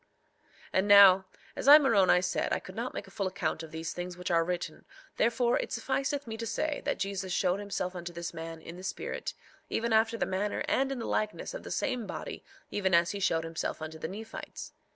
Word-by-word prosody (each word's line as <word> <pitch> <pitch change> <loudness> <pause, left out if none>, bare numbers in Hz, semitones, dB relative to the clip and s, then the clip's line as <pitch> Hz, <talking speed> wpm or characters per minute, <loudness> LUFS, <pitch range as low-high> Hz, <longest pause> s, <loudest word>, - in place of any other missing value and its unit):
3:17 - - -39 0.7
And 190 +2 +2
now, 195 -2 +8 0.3
as - - -4
I, 290 +1 +12
Moroni, 200 -10 +4
said 180 - -1
I - - +2
could 185 - -11
not 235 +3 -4
make - - -4
a - - -16
full 195 - -2
account 160 -3 -2
of 160 - -8
these 160 +1 -5
things 180 0 -5
which 180 0 -4
are 165 -1 +4
written 175 -2 -4 0.3
therefore 240 +1 +2
it - - -4
sufficeth 275 +4 -1
me 225 -1 -6
to 230 0 -4
say 290 +7 -1
that - - 0
Jesus 195 -1 -3
showed 185 +1 +1
himself 195 -2 -3
unto 175 -1 -5
this 170 0 -5
man 165 0 -7
in 170 +1 -9
the 185 - -10
spirit, - - -4 0.3
even 230 0 0
after 225 +1 +3
the - - 0
manner 195 +2 -1
and 270 +1 +1
in 270 - -2
the 230 - -4
likeness 215 - -2
of - - -6
the - - -9
same 250 -6 -1
body - - -6 0.3
even 190 -3 +2
as 170 +1 +4
he 200 - -4
showed 165 -4 +1
himself 165 0 -3
unto 160 0 -7
the 160 - -3
Nephites. 220 +5 -8
195 Hz, 225 wpm, -30 LUFS, 175-230 Hz, 0.7 s, I